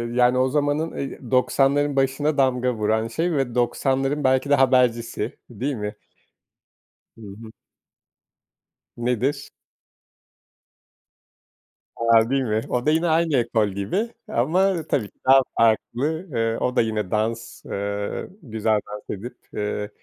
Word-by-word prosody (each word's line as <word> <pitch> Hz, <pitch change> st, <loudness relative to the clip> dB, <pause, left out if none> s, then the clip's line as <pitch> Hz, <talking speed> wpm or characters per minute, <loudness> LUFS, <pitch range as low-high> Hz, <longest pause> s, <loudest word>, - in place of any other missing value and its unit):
yani 125 Hz, 0 st, +4 dB
o 130 Hz, -, +3 dB
zamanın, 145 Hz, +3 st, 0 dB
eee 135 Hz, -, -5 dB
90´ların 140 Hz, +2 st, +2 dB
başına 140 Hz, +3 st, +1 dB
damga 125 Hz, -2 st, +2 dB
vuran 110 Hz, +1 st, 0 dB
şey 165 Hz, +9 st, -1 dB
ve 135 Hz, -5 st, -1 dB
90´ların 135 Hz, +3 st, 0 dB
belki 130 Hz, +2 st, +2 dB
de 145 Hz, -, +6 dB
habercisi 125 Hz, -3 st, +1 dB
değil 125 Hz, +4 st, -3 dB
mi? 105 Hz, -1 st, -5 dB, 1.2 s
Hı -, -, -16 dB, 0.2 s
hı. 110 Hz, -1 st, -10 dB, 1.5 s
Nedir? 125 Hz, +4 st, -1 dB, 2.5 s
A! 115 Hz, 0 st, +4 dB
Değil 135 Hz, 0 st, +1 dB
mi? 110 Hz, -2 st, 0 dB
O 125 Hz, +2 st, -1 dB
da 155 Hz, -, +4 dB
yine 165 Hz, +2 st, +2 dB
aynı 160 Hz, -3 st, +2 dB
ekol 115 Hz, -3 st, +1 dB
gibi, 100 Hz, -, -2 dB, 0.2 s
ama 175 Hz, +7 st, +1 dB
tabii 110 Hz, -6 st, 0 dB
ki -, -, -44 dB
daha 135 Hz, +1 st, +7 dB, 0.2 s
farklı. 130 Hz, -, +1 dB
Eee, 115 Hz, 0 st, 0 dB
o 125 Hz, +1 st, -1 dB
da -, -, +4 dB
yine 110 Hz, -4 st, -2 dB
dans, 115 Hz, +2 st, -2 dB
eee, 100 Hz, 0 st, -3 dB
güzel 110 Hz, -4 st, 0 dB
dans 105 Hz, 0 st, -9 dB
edip, 120 Hz, +3 st, -9 dB, 0.2 s
eee, 105 Hz, 0 st, -3 dB
125 Hz, 130 wpm, -23 LUFS, 110-140 Hz, 2.5 s, daha